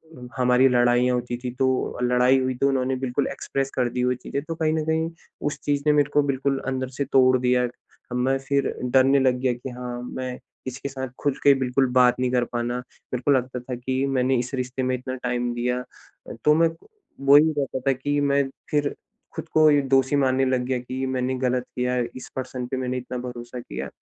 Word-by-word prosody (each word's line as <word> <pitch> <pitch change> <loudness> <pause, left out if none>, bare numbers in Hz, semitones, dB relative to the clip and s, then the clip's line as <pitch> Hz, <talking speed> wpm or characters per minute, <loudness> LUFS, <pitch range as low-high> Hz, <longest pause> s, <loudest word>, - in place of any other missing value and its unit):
अ, 125 -3 -10
हमारी 125 +1 +4
लड़ाईयाँ 120 0 +3
होती 120 0 -3
थीं, 125 0 -5
तो 130 -1 0
लड़ाई 125 +2 +4
हुई 130 -1 -1
तो 140 +2 +2
उन्होंने 130 -1 0
बिल्कुल 130 +1 -1
एक्सप्रेस 135 0 -3
कर 125 -2 +1
दी 125 +1 -2
वो 125 - +2
चीज़ें 140 +3 -4
तो 165 +1 -5
कहीं 155 -1 +1
न 155 -1 -1
कहीं 160 +1 0 0.4
उस 145 - -3
चीज़ 145 -1 0
ने - - +6
मेरेको 145 0 +3
बिल्कुल 135 0 0
अंदर 130 -1 -2
से 140 - +1
तोड़ 130 -1 +4
दिया। 125 0 +2 0.5
मैं 130 +2 +1
फिर 140 -1 +1
डरने 130 +2 +4
लग 130 -1 +2
गया 125 -1 +1
कि 125 +2 -7
हाँ, 125 -1 -6
मैं 125 0 -5 0.3
इसके 130 +2 -5
साथ 130 -1 -5
खुद 145 -2 0
के 140 - +7
बिल्कुल 130 +1 +1
बात 125 0 +4
नहीं 125 -1 0
कर 125 -1 +2
पाना, 120 +1 -1
मेरे 125 0 -7
को 145 - +4
लगता 125 -1 +1
था 125 +1 -6
कि 130 +2 -1
मैंने 130 -1 +1
इस 125 +2 -4
रिश्ते 130 +1 -3
में 130 0 +1
इतना 130 +1 -5
टाइम 125 -1 -2
दिया। 125 +1 -1 0.5
अ, - - -6
तो 150 - +6
मैं 165 0 +4 0.6
वो 140 +1 +7
ही 160 +2 +5
रहता 135 -2 -1
था - - +6
कि 145 +3 -1
मैं 140 0 +3 0.3
फिर 145 -1 0 0.4
खुद - - -5
को 155 0 +6
ही 145 -1 +4
दोषी 135 +1 +4
मानने 135 -1 +2
लग 130 -1 +1
गया 130 0 0
कि 130 +2 -4
मैंने 130 0 -1
गलत 125 -1 0
किया 125 0 0 0.2
इस 130 - -9
पर्सन 130 -1 -4
पे 130 - -3
मैंने 125 0 -2
इतना 125 0 -5
भरोसा 120 0 -7
किया। 65 - -6
130 Hz, 215 wpm, -24 LUFS, 125-135 Hz, 0.6 s, के